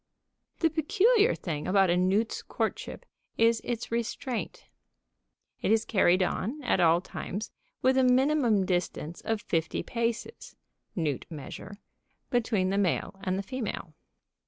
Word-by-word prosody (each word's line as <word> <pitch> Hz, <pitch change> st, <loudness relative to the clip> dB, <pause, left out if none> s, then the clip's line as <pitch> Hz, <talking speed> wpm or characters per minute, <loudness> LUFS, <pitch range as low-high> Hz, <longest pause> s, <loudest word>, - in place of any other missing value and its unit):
The 325 Hz, -2 st, +3 dB
peculiar 420 Hz, -, +3 dB
thing 150 Hz, -4 st, -4 dB
about 195 Hz, -2 st, +4 dB
a -, -, +3 dB
newt's 190 Hz, +5 st, +1 dB
courtship -, -, -4 dB, 0.3 s
is 230 Hz, 0 st, +4 dB
its 235 Hz, -2 st, -4 dB
restraint. 235 Hz, -2 st, -3 dB, 1.0 s
It -, -, 0 dB
is 220 Hz, 0 st, +3 dB
carried 185 Hz, -3 st, +3 dB
on, 230 Hz, +9 st, -2 dB
at 245 Hz, -, +2 dB
all 170 Hz, 0 st, +5 dB
times, 200 Hz, +2 st, -6 dB, 0.3 s
with 260 Hz, 0 st, +4 dB
a -, -, +4 dB
minimum 250 Hz, -5 st, +3 dB
distance 175 Hz, -2 st, -2 dB
of 225 Hz, -1 st, -1 dB
fifty 165 Hz, -1 st, -1 dB
paces 235 Hz, -, -3 dB, 0.4 s
(newt 155 Hz, -6 st, -2 dB
measure) 175 Hz, +5 st, -8 dB, 0.5 s
between 220 Hz, -6 st, +1 dB
the 200 Hz, -, +1 dB
male 195 Hz, +1 st, 0 dB
and 185 Hz, 0 st, 0 dB
the 200 Hz, -, -2 dB
female. 205 Hz, -7 st, -5 dB
210 Hz, 135 wpm, -28 LUFS, 185-245 Hz, 1.0 s, all